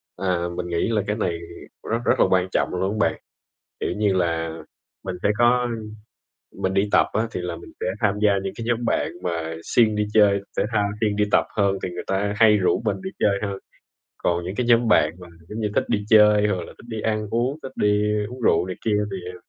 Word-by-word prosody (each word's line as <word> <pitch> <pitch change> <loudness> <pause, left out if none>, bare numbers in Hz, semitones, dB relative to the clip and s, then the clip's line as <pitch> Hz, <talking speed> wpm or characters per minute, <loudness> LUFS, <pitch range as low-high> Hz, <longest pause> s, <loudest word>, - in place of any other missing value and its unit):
À, 90 -2 -1
mình 90 - -3
nghĩ 85 +3 0
là 110 -2 +1
cái 105 - 0
này 85 -6 -2 0.5
rất 115 - +2
rất - - +2
là - - +6
quan 95 0 +2
trọng - - +1
luôn 100 +4 -1
á - - +5
bạn, - - -10 0.6
kiểu - - -2
như 105 -2 +2
là, 80 -2 -1 0.5
mình 95 -1 -3
sẽ - - +3
có 120 +1 +3 0.9
mình 95 0 -2
đi 100 +1 +1
tập - - +4
á, 110 +1 0
thì - - -4
là 85 -1 -3
mình 85 - -12
sẽ - - -3 0.2
tham 105 -1 +2
gia 105 -1 +5
những 95 0 -4
cái 115 - -6
nhóm 120 0 0
bạn - - 0
mà 80 -2 -3
siêng 110 -3 +3
đi 105 0 0
chơi 100 -2 +5 0.2
thể - - +3
thao, 105 -2 +1
siêng 105 -2 +1
đi 105 - +2
tập - - +4
hơn 100 -1 +2
thì - - -1
người 90 - -6
ta 100 +1 0
hay 105 -1 +5
rủ 95 +3 +1
mình 105 - -1
đi 190 - -4
chơi 100 -1 +2
hơn. 100 -2 -3 0.6
Còn 85 0 0
những 95 +3 -4
cái 125 0 -1
nhóm 120 -1 +4
bạn 75 -6 +4
mà 90 - -10 0.2
giống 110 +2 -5
như 105 - 0
thích - - +2
đi 105 -1 0
chơi 105 -1 +6
hoặc 95 -3 0
là - - -11
thích 120 - -15
đi 110 -2 -4
ăn 110 -1 -1
uống, 125 +6 0
thích 130 - -7
đi 105 0 +2 0.3
uống 125 +1 -9
rượu 85 -5 +3
này 90 - -5
kia 105 -2 +2
thì, 95 - -4 0.2
à 90 - -11
105 Hz, 240 wpm, -23 LUFS, 90-110 Hz, 0.9 s, là